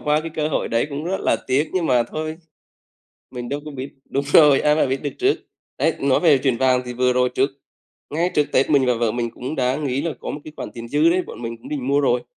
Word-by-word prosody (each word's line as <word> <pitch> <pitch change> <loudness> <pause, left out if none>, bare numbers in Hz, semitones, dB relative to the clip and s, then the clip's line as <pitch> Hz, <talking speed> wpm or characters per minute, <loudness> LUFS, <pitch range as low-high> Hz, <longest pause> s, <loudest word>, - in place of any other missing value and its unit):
qua 150 +1 +1
cái 165 - -6
cơ 155 0 0
hội - - -1
đấy 115 +3 +1
cũng 145 +2 -4
rất 190 +3 -2
là - - +2
tiếc, 140 +4 +1
nhưng 180 -3 0
mà 125 -4 +3
thôi, 155 +6 -5 1.0
mình 120 -1 -6
đâu 145 +1 -2
có 150 - -6
biết 135 0 -6 0.2
đúng 140 +1 -1
rồi, 145 -4 +7
ai 150 0 +3
mà 155 - +3
biết 135 0 -2
được 145 - -3
trước. 395 +2 +2 0.4
Đấy, 160 - +1
nói 135 -1 +2
về 155 -6 +5
chuyện 130 -2 0
vàng 130 0 +3
thì 125 - -5
vừa 125 +1 +2
rồi 125 0 +2
trước 130 +3 +1 0.6
ngay 170 +4 0
trước 150 - +4
Tết 130 - +2
mình 140 -3 +4
và 125 - +3
vợ 115 -1 0
mình 120 0 -2
cũng 130 +5 -6
đã 130 -1 +1
nghĩ 140 -3 -1
là 165 0 -2
có - - -6
một - - -6
cái 155 - -10
khoản - - -6
tiền 115 -1 -8
dư 150 +5 +3
đấy, 185 +2 +2
bọn 115 - -10
mình 115 0 -5
cũng 115 - -12
định 135 -4 -3
mua 140 +1 +3
rồi, 125 -3 +1
140 Hz, 270 wpm, -21 LUFS, 125-155 Hz, 1.0 s, rồi